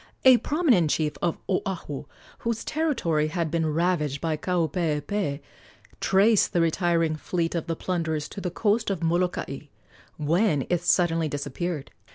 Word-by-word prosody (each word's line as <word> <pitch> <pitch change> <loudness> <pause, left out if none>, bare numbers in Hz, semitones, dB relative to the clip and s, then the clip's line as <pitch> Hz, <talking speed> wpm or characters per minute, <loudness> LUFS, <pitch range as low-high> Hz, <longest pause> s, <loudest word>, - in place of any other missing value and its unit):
A 260 -1 +9
prominent 260 - +2
chief 150 0 0
of 170 -2 0
Oahu, 180 -7 -3 0.3
whose 230 -1 -2
territory 235 - 0
had 160 -1 -2
been 160 -2 0
ravaged 150 -4 0
by 160 0 -1
Kaupeepee, 165 0 -1 0.6
traced 200 +2 +3
the 175 - +2
retiring 165 -1 +1
fleet 165 +1 -2
of 170 - -3
the 165 - -1
plunderers 160 -4 -2
to 195 - -7
the 180 - -2
coast 210 +5 +1
of 190 -4 -2
Molokai, 165 -4 -1 0.5
when 155 - +1
it 175 -1 +2
suddenly 170 -2 +2
disappeared. 145 +2 -4
170 Hz, 140 wpm, -26 LUFS, 155-185 Hz, 0.6 s, A